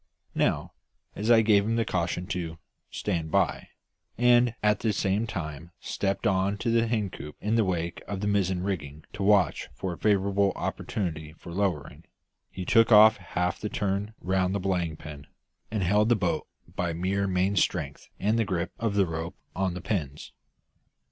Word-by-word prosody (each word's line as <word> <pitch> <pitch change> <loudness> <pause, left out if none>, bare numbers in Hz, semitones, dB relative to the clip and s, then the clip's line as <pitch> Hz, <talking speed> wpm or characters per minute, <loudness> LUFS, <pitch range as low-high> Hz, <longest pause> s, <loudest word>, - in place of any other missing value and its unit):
Now, - - 0 0.4
as 105 +3 -2
I 115 -2 +7
gave 105 -2 +4
him 115 +2 0
the 115 -1 +1
caution 90 0 -1
to 85 -3 -3 0.3
"stand 85 -6 -2
by," - - +1 0.5
and 120 0 +4
at 105 -1 +3
the 110 -2 0
same 100 +3 0
time 80 -5 -5
stepped 100 +3 -2
on 100 0 +1
to 115 +2 0
a - - -1
hen 110 -5 -1
coop 75 -3 -9
in 105 +2 -1
the 115 -1 +4
wake 85 -3 -2
of 100 -2 -4
the 105 - -3
mizzen 95 -3 +1
rigging 80 -6 -4
to 105 - -6
watch 100 -4 +3
for 95 -2 -3
a - - -11
favourable 100 -1 +2
opportunity 80 -6 -4
for 85 - -11
lowering, 90 -6 -2 0.5
he 90 - -6
took 115 +4 +4
off 110 0 +8
half 90 -1 -2
the 105 - -2
turn 100 +2 -2
round 95 +1 +1
the - - 0
belaying 90 -5 -1
pin, 75 -2 -10 0.4
and 105 -2 -1
held 105 +5 +3
the 120 - +5
boat 90 -6 -1 0.3
by 85 -2 -1
mere 95 +4 0
main 95 +2 +1
strength 80 -6 -1
and 110 +3 +1
the - - +3
grip 90 -4 -2
of 115 -3 -1
the 100 -1 +4
rope 80 0 -5 0.2
on 95 -1 -1
the 90 - -5
pins. 80 -7 -3
95 Hz, 180 wpm, -27 LUFS, 85-105 Hz, 0.5 s, off